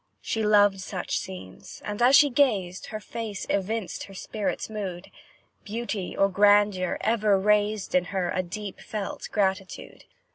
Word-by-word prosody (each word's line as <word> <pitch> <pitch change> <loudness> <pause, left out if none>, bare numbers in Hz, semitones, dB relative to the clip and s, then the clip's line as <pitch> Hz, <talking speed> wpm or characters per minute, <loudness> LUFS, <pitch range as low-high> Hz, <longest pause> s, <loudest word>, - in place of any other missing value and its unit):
She 225 - -2
loved 205 -2 +4
such - - -4
scenes, 95 0 -9
and 210 +2 -4
as 255 +3 +7
she 290 -1 +6
gazed, 205 -9 +1
Her 215 - -5
face 215 -1 -6
evinced 200 0 -2
her 195 - -13
spirit's 210 +2 -3
mood; 195 -5 -6 0.5
Beauty 215 -3 -4
or 195 - +4
grandeur 205 -1 +3
ever 215 -3 +2
raised 210 0 +1
In 180 -1 +3
her, 180 -1 -2
a 185 - 0
deep 195 +2 -7
felt 210 -2 -5
gratitude. 190 -2 -2
205 Hz, 145 wpm, -26 LUFS, 190-215 Hz, 0.5 s, as